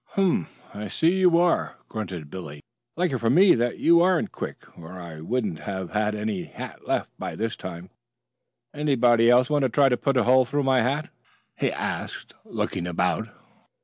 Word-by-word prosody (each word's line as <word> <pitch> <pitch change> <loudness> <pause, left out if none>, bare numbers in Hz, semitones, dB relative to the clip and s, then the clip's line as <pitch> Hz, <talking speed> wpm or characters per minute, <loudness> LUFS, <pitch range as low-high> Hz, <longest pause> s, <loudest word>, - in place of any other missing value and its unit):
"Humph! 185 - 0
I 105 +1 -6
see 160 - +2
you 180 -2 +5
are," 175 0 +1
grunted 90 -9 -6
Billy. 75 -6 -8 0.4
"Lucky 170 -8 0
for 115 - +1
me 180 +9 +6
that 120 0 0
you 170 0 +5
aren't 180 -1 +2
quick - - -7
or 85 +1 -11
I 80 -3 -9
wouldn't 105 -3 -2
have 95 -2 -5
had 105 0 0
any 105 -3 -3
hat - - -10
left - - -1
by - - -5
this 115 +1 -2
time. 90 0 -8 0.8
Anybody 120 -6 +3
else 125 +1 +5
want 150 0 +1
to 130 - +2
try 140 +3 +4
to 125 - +1
put 135 +1 0
a 125 - +4
hole 130 +3 +5
through 145 +3 -1
my 130 -1 +3
hat?" 135 +6 -1 0.4
he - - 0
asked - - -5
looking 90 -1 -3
about. 90 -1 -1
120 Hz, 180 wpm, -25 LUFS, 95-145 Hz, 0.8 s, me